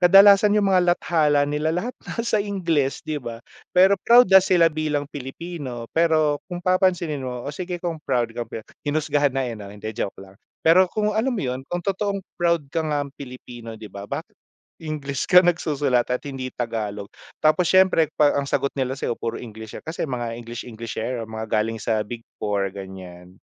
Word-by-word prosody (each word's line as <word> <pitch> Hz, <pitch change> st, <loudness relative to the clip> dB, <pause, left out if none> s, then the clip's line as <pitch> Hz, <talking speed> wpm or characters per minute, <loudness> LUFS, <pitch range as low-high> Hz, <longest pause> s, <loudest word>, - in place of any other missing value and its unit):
Kadalasan 200 Hz, +3 st, +7 dB
yung 200 Hz, -2 st, +3 dB
mga 180 Hz, -1 st, +4 dB
lathala 150 Hz, -4 st, +2 dB
nila 150 Hz, +2 st, -1 dB
lahat 180 Hz, +10 st, -1 dB, 0.2 s
nasa 230 Hz, -3 st, 0 dB
Ingles, 170 Hz, -9 st, -1 dB
'di 150 Hz, -2 st, -3 dB
ba? 115 Hz, -1 st, -8 dB, 0.3 s
Pero 190 Hz, +2 st, +7 dB
proud 245 Hz, +1 st, +7 dB
na 190 Hz, -, +10 dB
sila 175 Hz, -3 st, +3 dB
bilang 150 Hz, -2 st, -1 dB
Pilipino 140 Hz, -2 st, -7 dB
pero 155 Hz, -3 st, +2 dB
kung 175 Hz, -1 st, -6 dB
papansinin 180 Hz, -5 st, +2 dB
mo, 125 Hz, -2 st, -5 dB
o 145 Hz, -, -4 dB
sige 180 Hz, +3 st, -4 dB
kung 170 Hz, -2 st, -4 dB
proud 120 Hz, -6 st, 0 dB
ka 120 Hz, 0 st, -5 dB
be. 110 Hz, -, -7 dB, 0.2 s
Hinusgahan 145 Hz, -2 st, 0 dB
na, 135 Hz, -, +1 dB
eh, 120 Hz, -, -3 dB
no? 105 Hz, -3 st, -8 dB
Hindi 105 Hz, +2 st, -7 dB
joke 100 Hz, -, -4 dB
lang. 95 Hz, 0 st, -14 dB, 0.2 s
Pero 180 Hz, +3 st, +6 dB
kung 210 Hz, +2 st, 0 dB
alam 220 Hz, +5 st, +1 dB
mo 200 Hz, -, -2 dB
yun 125 Hz, 0 st, -2 dB
kung 175 Hz, -1 st, -3 dB
totoong 200 Hz, 0 st, -1 dB, 0.2 s
proud 170 Hz, -3 st, +2 dB
ka 165 Hz, -, +1 dB
ngang 145 Hz, -2 st, -2 dB
Pilipino 120 Hz, -4 st, -9 dB
'di 110 Hz, -1 st, -11 dB
ba, 100 Hz, +1 st, -8 dB
bakit -, -, -5 dB, 0.5 s
English 145 Hz, -3 st, -4 dB
ka 180 Hz, -, +9 dB
nagsusulat 145 Hz, -8 st, +1 dB
at 125 Hz, -, +1 dB
hindi 130 Hz, -2 st, -5 dB
Tagalog. 110 Hz, -5 st, -4 dB, 0.3 s
Tapos 160 Hz, +3 st, +3 dB
siyempre 185 Hz, -5 st, +4 dB
pag 145 Hz, -1 st, +5 dB
ang 140 Hz, 0 st, -1 dB
sagot 140 Hz, 0 st, 0 dB
nila 130 Hz, 0 st, -2 dB
sayo -, -, -1 dB
puro 115 Hz, 0 st, -4 dB
English 110 Hz, -2 st, -9 dB
kasi 160 Hz, +1 st, -4 dB
mga 120 Hz, -5 st, -3 dB
English 120 Hz, 0 st, -7 dB
Englishero 115 Hz, +1 st, -4 dB
mga 110 Hz, 0 st, -6 dB
galing 110 Hz, +1 st, 0 dB
sa 110 Hz, 0 st, 0 dB
big 115 Hz, +2 st, -8 dB, 0.2 s
4 100 Hz, -2 st, 0 dB
gan'yan, 95 Hz, -1 st, -10 dB
145 Hz, 185 wpm, -23 LUFS, 115-175 Hz, 0.5 s, na